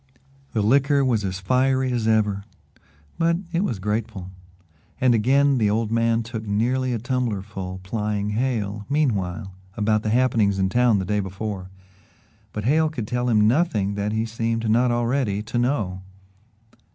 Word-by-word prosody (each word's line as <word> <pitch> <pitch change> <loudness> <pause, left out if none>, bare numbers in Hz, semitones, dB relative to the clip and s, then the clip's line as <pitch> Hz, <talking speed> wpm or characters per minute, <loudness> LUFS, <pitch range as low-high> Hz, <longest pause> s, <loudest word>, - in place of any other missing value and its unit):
The 110 - +1
liquor 140 +4 +3
was 115 -5 +1
as 95 -1 -3
fiery 130 +5 +1
as 120 -3 -1
ever, 105 -3 +2 0.8
but 165 0 +2 0.2
it 170 +3 +1
was 120 - -1
grateful, 105 -1 -3 0.7
and 125 -1 +4
again 135 +4 +3
the 105 -2 +3
old 110 +1 0
man 115 0 +2
took 115 -1 -6
nearly 125 +5 0
a 120 - 0
tumbler 120 -4 -2
full 95 -3 -6
plying 105 0 -2
Hale, 105 -3 -1
meanwhile, 105 -10 -1 0.2
about 110 0 +2
the 110 - -2
happenings 115 -4 +2
in 95 -1 +1
town 120 0 +3
the 95 - -2
day 105 +3 0
before 95 -1 -5 0.8
but 105 - -5
Hale 155 +6 +3
could 120 -9 -5
tell 125 +1 -1
him 105 -2 +4
nothing 115 - +1
that 100 +1 -2
he 110 +1 0
seemed 115 0 -2
not 120 +3 +3
already 120 -3 0
to 120 +2 -2
know. 110 -8 -1
110 Hz, 160 wpm, -23 LUFS, 105-125 Hz, 0.8 s, and